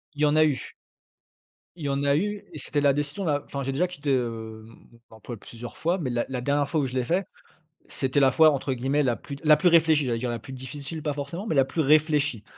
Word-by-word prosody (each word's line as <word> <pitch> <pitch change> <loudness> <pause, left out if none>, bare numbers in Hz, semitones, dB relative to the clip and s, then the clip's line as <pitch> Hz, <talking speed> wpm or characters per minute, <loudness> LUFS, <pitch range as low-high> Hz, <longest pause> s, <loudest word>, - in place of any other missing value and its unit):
Il 145 - -6
y - - +6
en 150 0 +3
a 155 - +6
eu 140 -5 -2 1.0
il 155 - -7
y 140 - 0
en 140 +1 -1
a 140 0 +3
eu 205 +5 -2
et - - -7
c'était 145 - -1
la 140 -1 +4
décision 145 +6 -3
la 145 -3 0
enfin, 140 0 -5
j'ai 135 - -2
déjà 175 +7 +1
quitté, 145 -5 -3
hem, 110 -3 -3 0.4
mon 110 -2 -17
emploi, 115 +1 -8
plusieurs 115 +1 -10
fois, 170 +3 0
mais 135 -7 -2
la 120 -1 -1
la 125 -2 -3
dernière 145 +2 +1
fois 160 - 0
où 135 - -1
je 125 - -7
l'ai 130 - +1
fait, 180 +8 0 0.6
c'était 135 +1 0
la 135 -1 +5
fois, 160 -1 +6
entre 135 -1 -2
guillemets, 135 +4 0
la 120 -3 +1
plus 140 - -8
«la 150 -1 +6
plus 175 - +4
réfléchie», 160 -3 +4
j'allais 120 -2 -1
dire: 125 0 -2
«la 120 - -3
plus 115 +5 -10
difficile» 140 +5 -7
pas 150 - -1
forcément, 145 +9 -5
mais 160 - -1
la 135 -1 +5
plus 160 - -2
réfléchie. 150 -5 +2
140 Hz, 260 wpm, -26 LUFS, 130-155 Hz, 1.0 s, y